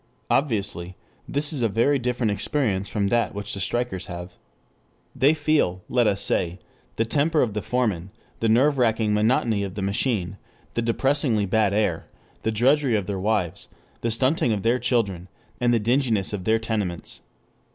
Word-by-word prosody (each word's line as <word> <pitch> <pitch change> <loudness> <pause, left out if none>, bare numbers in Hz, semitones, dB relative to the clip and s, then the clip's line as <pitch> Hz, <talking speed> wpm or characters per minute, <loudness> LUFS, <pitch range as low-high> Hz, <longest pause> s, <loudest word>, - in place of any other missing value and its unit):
Obviously 100 - -1 0.3
this 145 +2 0
is 140 - -2
a 115 - +2
very 125 +7 +2
different 125 -2 0
experience 100 -2 0
from 100 -2 -1
that 115 -1 +1
which 100 +1 -4
the 100 - -5
strikers 95 -2 -2
have. 90 0 -7 0.8
They 145 +4 +4
feel, 150 - +1
let 120 -3 +3
us 100 -1 +1
say, 85 +1 0 0.4
the 115 - +1
temper 150 +6 +2
of 110 -5 -2
the 105 - -2
foreman, 105 -8 -1 0.3
the 115 - +1
nerve 135 +5 +3
racking 110 -3 +2
monotony 110 0 +2
of 95 -2 -5
the 100 - -3
machine, 100 -2 -1 0.4
the 115 - 0
depressingly 115 -2 +1
bad 105 0 +2
air, 100 -5 0 0.3
the - - -1
drudgery 130 +3 +3
of 100 -3 0
their 95 0 -3
wives, 100 -4 -1 0.3
the 115 - 0
stunting 130 +2 +2
of 105 -3 -1
their 120 +2 +2
children, 110 -7 0 0.3
the 120 -1 +3
dinginess 115 -3 +1
of 95 -3 -4
their 110 0 +3
tenements. 105 -6 -3
110 Hz, 165 wpm, -24 LUFS, 100-125 Hz, 0.8 s, They